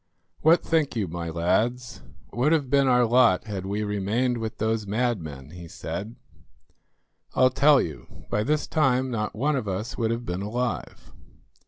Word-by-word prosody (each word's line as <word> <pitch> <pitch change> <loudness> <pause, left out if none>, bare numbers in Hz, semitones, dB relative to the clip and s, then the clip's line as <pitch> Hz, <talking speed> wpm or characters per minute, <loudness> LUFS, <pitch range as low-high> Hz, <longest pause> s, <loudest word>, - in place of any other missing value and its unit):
"What 165 +3 +4
think 160 -5 0
you, 105 -5 -1
my 85 0 -5
lads, 120 +10 -1 0.3
would 135 +7 +2
have 140 -5 0
been 140 -1 +4
our 125 -1 +4
lot 115 -5 +4
had 100 -4 -5
we 105 +2 -2
remained 105 +5 -1
with 110 0 -5
those 110 -1 -1
madmen?" 95 - -2
he 85 0 -10
said. 105 +7 -6 1.2
"I'll 130 0 +4
tell 140 +2 +5
you; 80 - -6
by 105 - +1
this 150 +4 0
time 130 -4 +1
not 105 -3 -3
one 145 +7 +1
of 130 -6 -3
us 100 +7 -4
would 115 -1 +1
have 115 +1 -3
been 90 +2 -3
alive." 120 +4 -4
115 Hz, 165 wpm, -25 LUFS, 100-130 Hz, 1.2 s, tell